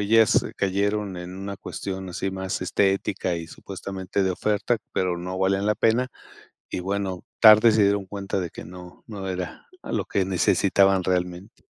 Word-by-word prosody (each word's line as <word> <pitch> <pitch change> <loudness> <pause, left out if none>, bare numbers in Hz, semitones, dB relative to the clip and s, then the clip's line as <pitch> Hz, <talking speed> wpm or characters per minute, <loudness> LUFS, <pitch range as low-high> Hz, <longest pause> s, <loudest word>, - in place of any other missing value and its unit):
ellas 110 +1 +4
cayeron 100 0 0
en 90 +1 -7
una 100 +1 -5
cuestión 95 -1 -6
así, 95 +2 -3
más 95 0 -3
estética 95 -1 0
y 80 -1 -6
supuestamente 95 +2 -4
de 95 - +1
oferta. 105 +5 0 0.2
Pero 90 -1 0
no 90 +2 -5
valían 95 +1 +1
la 105 - +2
pena 120 +3 +2 0.6
y, - - -3
bueno, 95 -1 -3 0.2
tarde 110 +1 +8
se 110 - +3
dieron 100 0 +2
cuenta 100 0 -3
de 90 -3 -4
que - - -9
no 90 +1 -12
no 100 -3 -6
era 90 -1 -5
algo - - -2
que 95 - 0
necesitaban 95 +1 +3
realmente. 90 +2 -3
95 Hz, 165 wpm, -25 LUFS, 90-100 Hz, 0.6 s, tarde